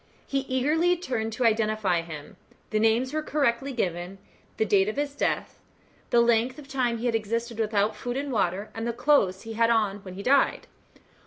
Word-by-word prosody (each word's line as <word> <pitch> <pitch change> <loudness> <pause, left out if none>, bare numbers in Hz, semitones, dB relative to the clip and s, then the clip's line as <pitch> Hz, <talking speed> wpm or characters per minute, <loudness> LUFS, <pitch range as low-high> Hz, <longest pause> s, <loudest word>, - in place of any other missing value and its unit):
He 275 - -1
eagerly 310 +7 +2
turned 240 -9 -3
to 245 +2 -1
identify 215 -5 +2
him. 155 -3 -9 0.4
The 215 - +1
name 225 +2 +4
was 260 0 -5
correctly 275 -3 0
given; 180 -5 -3 0.4
the 220 - +2
date 200 -1 +3
of 215 - -4
his 285 0 -2
death; 285 - -2 0.5
the 240 - +5
length 235 +2 +2
of 295 -2 -11
time 255 -4 0
he 230 - -5
had 240 - +1
existed 230 +1 -2
without 210 -1 +1
food 245 +1 -4
and 280 0 -3
water, 200 -2 -1
and 225 +1 -4
the 235 - -1
clothes 235 -7 +2
he 225 -1 -7
had 230 +1 +2
on 215 -4 +2
when 185 -2 -10
he 200 - -7
died. 275 +4 +3
230 Hz, 190 wpm, -26 LUFS, 210-260 Hz, 0.5 s, the